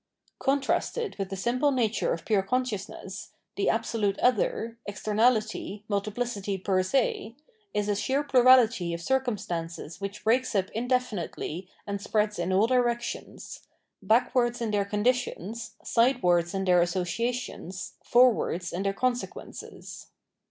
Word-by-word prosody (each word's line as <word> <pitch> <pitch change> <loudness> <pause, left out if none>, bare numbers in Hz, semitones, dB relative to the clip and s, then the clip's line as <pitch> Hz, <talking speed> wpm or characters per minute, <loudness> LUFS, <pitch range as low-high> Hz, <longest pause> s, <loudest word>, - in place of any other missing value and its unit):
Con 275 +1 +2
trasted 445 - -1
with 195 -1 -2
tbe 195 - -5
simple 250 +8 +1
nature 235 -4 +1
of 165 - -3
pure 210 -3 +3
consciousness, 200 -4 -4 0.2
tbe 200 - 0
absolute 220 -3 0
other, 230 -1 +1
extemabty, 215 0 0
multipbcity 205 -1 -2
per 190 -2 +3
se, 230 +2 0 0.4
is 210 0 0
a 205 - +1
sheer 265 +7 0
plurality 245 -10 +5
of - - -6
circumstances 180 - -2
which 200 +1 -5
breaks 245 +2 +2
up 190 -1 +1
in 235 +3 -3
definitely 195 -7 -2 0.2
and 200 -1 -4
spreads 210 -1 0
in 175 +2 -1
all 195 +3 +4
directions 240 -1 -2 0.2
— - - -54
backwards 240 +1 +2
in 230 -2 -2
their 205 -1 +1
conditions, 230 0 -1
sidewards 190 -8 +2
in 195 0 -1
their 180 -1 +5
associations, 185 +1 -2
for 250 0 +6
wards 180 -3 -3
in 180 - -2
their 195 0 0
consequences. 250 +3 -4
215 Hz, 135 wpm, -27 LUFS, 195-245 Hz, 0.4 s, for